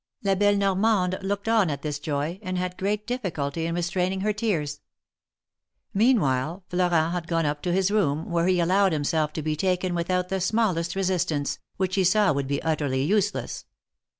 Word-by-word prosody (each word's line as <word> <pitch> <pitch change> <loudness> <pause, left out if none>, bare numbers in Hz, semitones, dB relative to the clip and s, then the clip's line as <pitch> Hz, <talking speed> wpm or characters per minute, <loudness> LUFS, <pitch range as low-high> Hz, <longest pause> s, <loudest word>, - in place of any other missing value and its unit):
La 195 -1 +2
belle 205 +1 +3
Normande 195 -1 +1
looked 200 +2 -3
on 220 -6 +3
at 140 -2 -4
this 150 -1 -3
joy, 150 +4 -3
and 185 -3 -3
had 180 0 -2
great 205 +3 -2
difficulty 165 - -2
in 170 - -2
restraining 180 +2 -1
her 210 +1 +1
tears. 165 -10 -2 1.1
Meanwhile 185 - +2
Florent 175 -3 +2
had 175 -2 -3
gone 165 -1 0
up 145 0 -1
to 180 - -1
his 190 +2 +2
room, 160 -7 0
where 170 0 +1
he 185 -1 +3
allowed 185 +2 +3
himself 150 +1 0
to 155 - -4
be 155 0 -1
taken 180 +1 0
without 180 +1 -1
the 190 0 -1
smallest 185 -5 0
resist 185 -2 0
ance, 145 -3 -2 0.2
which 185 -1 -1
he 190 - +2
saw 195 -1 +4
would 140 -1 -2
be 140 0 -2
utterly 145 -5 0
useless. 200 +7 -1
180 Hz, 180 wpm, -25 LUFS, 155-195 Hz, 1.1 s, saw